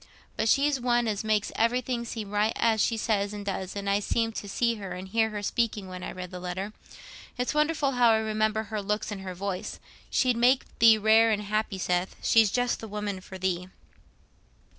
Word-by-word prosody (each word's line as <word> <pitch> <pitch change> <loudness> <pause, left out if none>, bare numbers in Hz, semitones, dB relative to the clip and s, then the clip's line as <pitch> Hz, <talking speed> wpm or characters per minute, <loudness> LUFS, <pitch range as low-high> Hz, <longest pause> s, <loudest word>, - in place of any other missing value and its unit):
But 220 - 0
she's 280 0 +3
one 240 -1 +2
as 210 -1 -1
makes 215 -1 0
everything 235 +1 0
seem 220 -3 -6
right 210 +1 +1 0.3
she 225 +2 +2
says 205 -2 0
and 205 -1 -7
does, 190 -1 -4
and 200 0 -4
I 200 +1 +2
seemed 225 +2 -1
to 205 - -6
see 235 +3 +1
her 195 -3 -6
and 185 +1 -7
hear 220 +2 +1
her 210 -1 -5
speaking 215 -3 -1
when 185 0 -8
I - - -5
read 180 0 -7
the 180 - -6
letter. 185 +3 -4 0.6
It's 250 +3 -1
wonderful 300 -2 +1
how 245 -2 +4
I 220 - +5
remember 220 0 0
her 215 -1 -4
looks 210 +2 -2
and 200 -2 -5
her 185 -1 -6
voice. 190 0 -4 0.3
She'd 250 -2 +2
make 250 +3 +4 0.2
thee 225 -1 +7
rare 220 +2 +5
and 210 -1 0
happy, 215 -1 -1
Seth; 180 0 -1
she's 225 -2 +5
just 245 +3 0
the 225 - -7
woman 205 -2 -4
for 190 0 -10
thee." 180 -1 -2
215 Hz, 205 wpm, -27 LUFS, 195-230 Hz, 0.6 s, thee